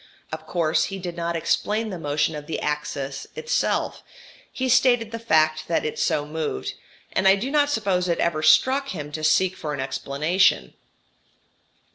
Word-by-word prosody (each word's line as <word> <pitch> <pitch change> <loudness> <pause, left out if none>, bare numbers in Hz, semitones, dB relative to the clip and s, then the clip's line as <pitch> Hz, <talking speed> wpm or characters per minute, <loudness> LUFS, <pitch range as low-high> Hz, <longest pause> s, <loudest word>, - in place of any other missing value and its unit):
Of 155 0 -7
course 165 -2 +1
he 195 - -5
did 175 -2 -6
not 170 0 -2
explain 215 +6 0
the 180 - -5
motion 150 +1 0
of 150 0 -8
the 160 - -3
axis 150 -2 -3
itself. 470 +1 -1 0.5
He 260 - -2
stated 245 -2 +3
the 230 - -5
fact 155 -7 +2
that 165 - 0
it 155 - -3
so 145 - +1
moved, 150 - -4 0.4
and 190 - +2
I 190 - +7
do 240 +7 -4
not 290 -1 +3
suppose 195 -8 0
it 170 - +1
ever 170 -2 0
struck 260 - +4
him 150 - -6
to 155 +1 -5
seek 180 +4 +3
for 150 -4 -4
an - - -8
explanation. 140 +7 +1
170 Hz, 170 wpm, -24 LUFS, 155-210 Hz, 0.5 s, I